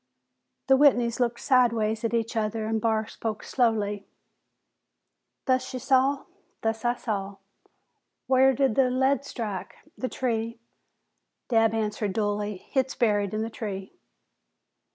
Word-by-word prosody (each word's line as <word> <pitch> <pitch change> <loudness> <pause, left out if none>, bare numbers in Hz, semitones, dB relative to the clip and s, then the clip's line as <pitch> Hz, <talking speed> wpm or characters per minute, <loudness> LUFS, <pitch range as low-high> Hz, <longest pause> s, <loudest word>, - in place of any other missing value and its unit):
The 270 - +5
Whitneys 245 -5 +4
looked 240 -1 0
sidewise 230 -4 +2
at 230 0 0
each 230 0 -1
other 220 0 -1
and 220 0 -1
Barr 220 -1 +1
spoke 220 0 -5
slowly, 210 -5 0 1.4
"Thus 255 -1 +1
ye - - -3
saw?" 270 +2 +2 0.4
"Thus 225 +1 -1
I 240 0 +2
saw." 200 -4 -4 0.9
"Whar 265 0 +5
did 265 -2 +2
the 260 +2 +3
lead 265 +2 +2
strike?" 215 -8 -5 0.2
"The 255 - -3
tree," 230 -2 -2 0.9
Dabb 225 -2 +3
answered 210 -2 -1
dully. 205 -1 -1
"Hit's 265 -1 0
buried 205 -3 +1
in 215 - -1
the 225 - -4
tree." 195 -4 -6
225 Hz, 130 wpm, -26 LUFS, 215-255 Hz, 1.4 s, The